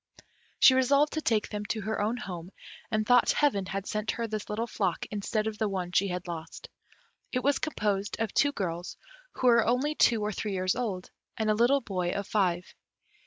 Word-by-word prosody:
She 260 - +8
resolved 280 +3 +3
to 315 - -1
take 220 -7 +1
them 210 -1 -4
to 215 +1 -2
her 215 +1 -2
own 220 +4 0
home, 180 -6 -7 0.4
and 215 -2 0
thought 245 +1 +5
Heaven 205 -11 +1
had 195 +1 -4
sent 215 +1 -3
her 235 - -1
this 215 -2 -5
little 220 +2 -1
flock 195 -6 -2
instead 215 +1 -1
of 220 -1 -4
the 215 -2 +1
one 185 -2 -3
she 200 +2 +2
had 180 -1 -4
lost. 165 -2 -7 0.6
It 250 -1 -1
was 285 0 +2
composed 205 -9 -2
of 225 -2 -2
two 285 - +3
girls, 175 -7 -4 0.4
who - - -4
were 235 -2 +6
only 250 +7 +1
two 230 -7 +3
or 210 - -1
three 210 0 -3
years 185 -1 0
old, 210 -7 -3 0.3
and 220 -1 +1
a - - +4
little 240 +6 +3
boy 185 -6 -2
of 200 - -3
five. 185 -4 0
215 Hz, 205 wpm, -28 LUFS, 190-235 Hz, 0.6 s, She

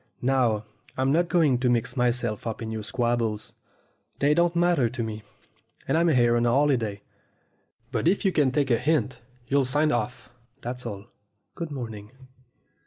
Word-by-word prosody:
Now, 120 -5 +2 0.3
I'm 130 +1 +1
not 170 +3 +2
going 150 -8 +3
to 125 -1 +1
mix 120 +1 0
myself 120 -3 0
up 110 - -4
in 110 - -5
your 110 -1 -4
squabbles. 115 -1 -1 0.6
They 145 +2 +3
don't 170 +2 +2
matter 170 -8 +3
to 120 0 -4
me, 110 -1 -5 0.7
and - - +1
I'm 170 +1 +3
here 120 -6 +4
on 120 0 +2
a - - +3
holiday; 120 -7 +1 0.9
but - - 0
if 195 +4 +2
you 190 - +4
can 150 -6 +3
take 135 0 0
a 115 - +3
hint, 140 -5 0 0.2
you'll 140 +1 +2
sign 145 +4 +2
off 120 0 -3 0.3
that's 125 0 -5
all. 100 -2 -7 0.5
Good 170 -2 -5
morning." 110 -7 -7
125 Hz, 170 wpm, -26 LUFS, 115-150 Hz, 0.9 s, here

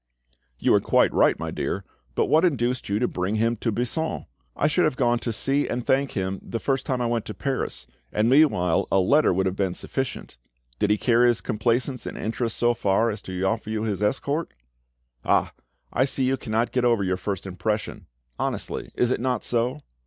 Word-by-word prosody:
"You - - +1
were - - +6
quite - - +3
right, - - +4
my - - -4
dear; - - -3 0.3
but - - +2
what 155 +1 +3
induced 125 - 0
you 100 - +1
to 125 +3 +1
bring 95 +4 -2
him 115 +2 +1
to 115 +2 -1
Buisson? 125 +9 -2 0.3
I - - 0
should 155 +4 +3
have 155 - +1
gone 120 -2 +2
to 120 - -2
see 135 +6 0
and 120 0 -3
thank 135 +1 +1
him 95 -1 -2
the 115 - -5
first 135 +3 -1
time 130 -3 0
I - - +1
went 115 -2 0
to 105 - -6
Paris, 135 -2 -3 0.3
and 105 +1 +1
meanwhile 120 - +3
a 95 - +4
letter 145 +12 +4
would 95 +1 +1
have 95 0 -1
been 95 -3 -1
sufficient. 135 - -4 0.4
Did 105 - +2
he 105 - +3
carry 120 +2 +4
his 120 -2 +3
complaisance 120 +4 -1
and - - -6
interest 115 +1 -2
so 120 0 +3
far 110 +1 +1
as 105 - -6
to 95 0 -5
offer 110 +2 -1
you 110 0 -2
his 105 -3 -2
escort?" 140 - -1 0.7
"Ah! - - +2 0.4
I 130 - +3
see 135 -1 -1
you 130 +1 +2
cannot 115 -2 -1
get 125 - 0
over 115 -4 +3
your 95 -1 0
first 95 -1 -4
impression—honestly, 90 - -4
is 125 0 +2
it 130 - 0
not 125 0 0
so?" 125 +5 0
115 Hz, 205 wpm, -25 LUFS, 105-130 Hz, 0.7 s, were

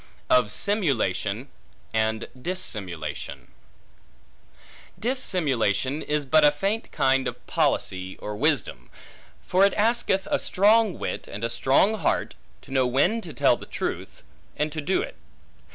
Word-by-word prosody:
Of 125 -4 +4
Simulation 120 - 0 0.5
And 110 0 0
Dissimulation 105 - -5 1.5
DISSIMULATION 145 - 0
is 150 -1 -1
but 155 +3 +4
a 150 - +7
faint 195 +9 -2
kind 135 -1 +2
of - - -7
policy, 95 0 -1
or 105 - -6
wisdom; 145 +4 0 0.6
for 185 +2 +3
it 200 - +4
asketh 215 -3 +1
a - - +2
strong 210 +1 +3
wit, - - -4
and 105 +3 -7
a 115 - -1
strong 165 - +3
heart, - - 0 0.3
to - - -15
know 130 -2 +2
when 175 - +2
to 170 - -8
tell - - +2
truth, - - -5 0.3
and 150 +1 0
to 155 0 -4
do 185 +6 0
it. - - -9
145 Hz, 130 wpm, -25 LUFS, 115-190 Hz, 1.5 s, a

